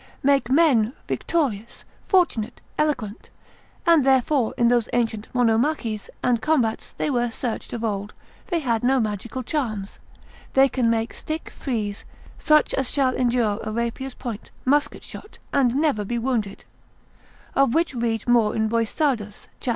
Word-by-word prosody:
make 275 -3 +3
men 260 -6 +4
victorious, 235 -10 -2 0.2
fortunate, 255 - +1 0.2
eloquent; 255 -9 -2 0.6
and 335 -4 +5
therefore 265 -1 +3
in 235 - +4
those 240 -2 +2
ancient 225 -3 0
monomachies 235 -2 +1
and 240 -2 +2
combats 255 -8 0
they - - -2
were 240 -4 +1
searched 230 0 -4
of 235 -1 -4
old, 205 -1 -2 0.4
they 350 - 0
had 240 -8 0
no 265 +2 +3
magical 220 +3 -3
charms; 220 -8 -3 0.6
they 270 0 +7
can 250 -3 +1
make 225 0 0
stick 315 +1 -5
frees, 215 -6 -3 0.4
such 305 -1 +4
as 270 -2 +1
shall 265 -3 +2
endure 235 -4 +1
a 215 - -4
rapier's 235 +3 -3
point, 235 -5 -6 0.2
musket 290 +3 +1
shot, 420 - -9 0.2
and 260 -3 +3
never 285 -7 +1
be 235 +4 -3
wounded: 230 -5 -2 0.9
of 270 -3 +3
which 330 -2 +2
read 230 -2 -2
more 235 -3 +3
in 220 0 +1
Boissardus, 230 -1 -1
cap. - - -4
240 Hz, 145 wpm, -23 LUFS, 225-275 Hz, 0.9 s, they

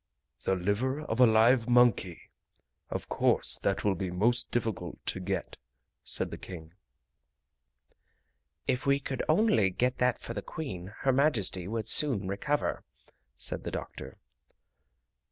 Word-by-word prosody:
"The 95 - +2
liver 105 +10 -1
of 125 -6 -4
a 125 - +8
live 115 +2 +4
monkey! 120 -8 +2 0.6
Of - - -5
course - - +1
that 100 - -1
will 100 - +2
be 95 0 -4
most 115 +7 +1
difficult 115 -4 -3
to - - -1
get," 95 +1 -4 0.5
said - - -2
the - - -7
King. 80 -3 -10 1.9
"If 125 +3 -1
we 140 0 +3
could 135 -1 -4
only 155 - +3
get 125 +7 -1
that 125 -1 +2
for 115 - -8
the 105 - -4
Queen, 95 - -7
Her 135 - +3
Majesty 110 - +2
would 110 +1 -3
soon 115 -8 +4
recover," 140 +10 -2 0.5
said - - +1
the - - -4
doctor. - - -7
115 Hz, 135 wpm, -29 LUFS, 95-130 Hz, 1.9 s, a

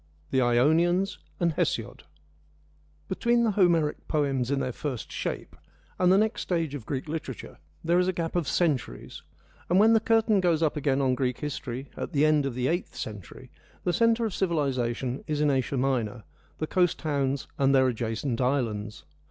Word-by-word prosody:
— 75 0 -34
The 130 - +3
Ionians 165 +10 +2 0.2
and 170 -2 +1
Hesiod - - -2 1.0
Between 235 +5 +1
the 225 - +2
Homeric 170 -6 +2
poems 135 -5 0
in 140 -1 +1
their 130 - -2
first 130 -2 -5
shape - - -4 0.4
and 180 0 +4
the 190 - +6
next 215 +1 +1
stage 165 -5 -1
of 135 -7 -7
Greek 135 +1 -3
literature 155 0 -6 0.2
there 170 +2 +3
is 180 - +2
a - - +2
gap 165 -1 -3
of 170 -5 0
centuries, 140 - -1 0.5
and 180 - +3
when 220 +3 +6
the 225 - +5
curtain 225 -1 +3
goes 170 -3 +2
up 155 - +1
again 140 -2 +1
on 130 -1 +2
Greek 125 -1 -1
history 135 -3 -5
at - - -5
the 145 +1 +3
end 150 -2 +3
of 130 - -5
the 125 0 -1
eighth 175 +4 -2
century, 105 -5 -8 0.3
the 175 - 0
centre 230 +4 +3
of 215 - -3
civilisation 135 -8 -1
is 150 -2 -1
in 150 -1 +3
Asia 135 0 0
Minor, 120 -4 -1 0.3
the 155 - -2
coast 175 +1 +1
towns 140 -3 -1
and 135 0 +4
their 130 -1 +5
adjacent 115 +1 -2
islands. 115 -5 -1
145 Hz, 180 wpm, -27 LUFS, 130-175 Hz, 1.0 s, the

